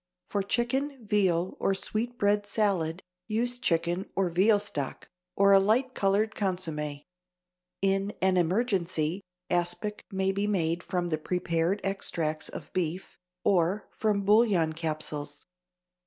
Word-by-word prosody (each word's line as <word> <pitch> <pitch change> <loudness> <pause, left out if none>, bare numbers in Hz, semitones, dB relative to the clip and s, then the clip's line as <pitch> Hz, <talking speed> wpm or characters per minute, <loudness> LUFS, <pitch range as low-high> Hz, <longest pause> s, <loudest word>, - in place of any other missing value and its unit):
For 200 - 0
chicken, 245 +5 -1
veal 190 -4 +1
or 195 - +1
sweetbread 210 -1 0
salad, 190 -5 0 0.2
use 240 +3 -1
chicken 175 -1 0
or 190 -2 +1
veal 200 +5 +4
stock, 150 -9 -3 0.3
or 200 0 +5
a 195 - +8
light 235 +6 +2
colored 205 +3 +1
consommé. 160 -7 -2 0.8
In 195 +1 +1
an 190 0 +3
emergency, 180 -2 0 0.3
aspic 175 +4 0
may 190 -1 0
be 200 +2 -1
made 170 -4 0
from 175 -1 -2
the 155 -2 -1
prepared 175 +3 0
extracts 165 -5 -1
of - - -9
beef, 180 +1 -3 0.3
or 185 +2 +1
from 205 -2 0
bouillon 200 -7 +4
capsules. 150 -2 -4
190 Hz, 125 wpm, -28 LUFS, 170-210 Hz, 0.8 s, a